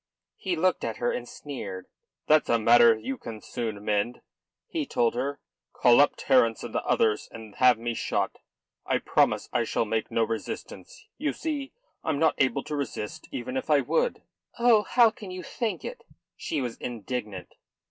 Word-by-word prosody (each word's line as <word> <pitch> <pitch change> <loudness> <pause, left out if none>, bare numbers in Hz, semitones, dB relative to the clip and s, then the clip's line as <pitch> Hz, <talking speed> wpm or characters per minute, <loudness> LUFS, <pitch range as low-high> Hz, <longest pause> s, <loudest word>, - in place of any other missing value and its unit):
He 185 -2 -2
looked 185 +3 +1
at 115 -2 -3
her 120 - 0
and 120 0 -4
sneered. 100 -10 -7 0.4
"That's 155 0 +4
a 115 - +4
matter 115 0 +6
you 125 +4 -5
can 110 -2 -7
soon 105 -2 -5
mend," 105 +4 0 0.5
he 325 -3 -2
told 120 - +1
her. 135 +4 -2 0.3
"Call 120 +2 +6
up 145 - +4
Terence 115 -4 +3
and - - -7
the - - -1
others 105 -1 +1
and 110 -2 -10
have 125 -2 +6
me 120 +1 -3
shot. - - -2 0.4
I - - +1
promise - - +1
I - - +2
shall - - 0
make 110 0 -1
no 115 - +1
resistance. 110 -4 -6
You 300 +1 0
see, 290 -4 -4 0.3
I'm 155 -3 0
not 160 +1 +3
able 135 +1 +2
to 150 - -4
resist 130 -7 -5
even 125 +1 -5
if 130 - -3
I 145 -2 +5
would." 485 - 0 0.3
"Oh, 235 -3 +5
how 235 +1 +4
can 210 -3 -10
you 185 0 -6
think 220 0 -3
it?" - - -7 0.3
She 150 - -3
was 120 -3 -4
indignant. 110 -5 -5
125 Hz, 180 wpm, -27 LUFS, 115-160 Hz, 0.5 s, matter